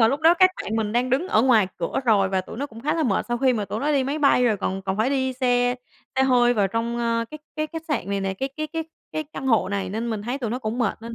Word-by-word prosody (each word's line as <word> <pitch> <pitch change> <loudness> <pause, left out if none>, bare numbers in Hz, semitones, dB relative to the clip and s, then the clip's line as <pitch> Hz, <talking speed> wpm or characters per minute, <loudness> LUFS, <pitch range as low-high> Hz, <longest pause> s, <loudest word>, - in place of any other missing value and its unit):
mà 225 - +6
lúc 280 +3 -1
đó 330 +2 +6
các 370 +1 +5
bạn 220 - -3
mình 215 -1 -1
đang 245 +1 +1
đứng 290 +9 +1
ở 220 - +3
ngoài 225 -7 +4
cửa 170 +7 -2
rồi 205 -5 +3
và 190 -1 0
tụi 185 - -10
nó 280 +3 -3
cũng 225 -4 -12
khá 300 +4 0
là 325 - 0
mệt 220 -8 +1
sau 240 0 -1
khi 260 -1 +3
mà 215 -3 -1
tụi 215 - -4
nó 295 +2 +1
đi 275 -2 +2
máy 280 +3 -2
bay 275 -4 +4
rồi 220 -4 +3
còn 195 0 -3
còn 190 0 -2
phải 225 +5 +1
đi 260 -1 0
xe 245 -1 +1 0.4
xe 265 - +4
hơi 245 -2 +4
vào 205 -3 +2
trong, 230 +3 -2
a, 230 -1 0
cái 305 - -8 0.2
cái 310 0 -1
khách 325 +1 -7
sạn 270 -9 -2
này 200 - 0
nè, 195 0 -2
cái 265 +8 -3
cái 310 0 -2
cái 325 0 -4 0.3
cái 310 - -2
căn 270 - -5
hộ 225 -7 +3
này 195 -1 -2
nên 230 +3 -3
mình 210 -2 -3
thấy 245 +5 -3
tụi 235 -5 -3
nó 250 - -2
cũng 225 0 -4
mệt 235 -2 -1
nên 230 0 -7
240 Hz, 320 wpm, -24 LUFS, 215-270 Hz, 0.4 s, mà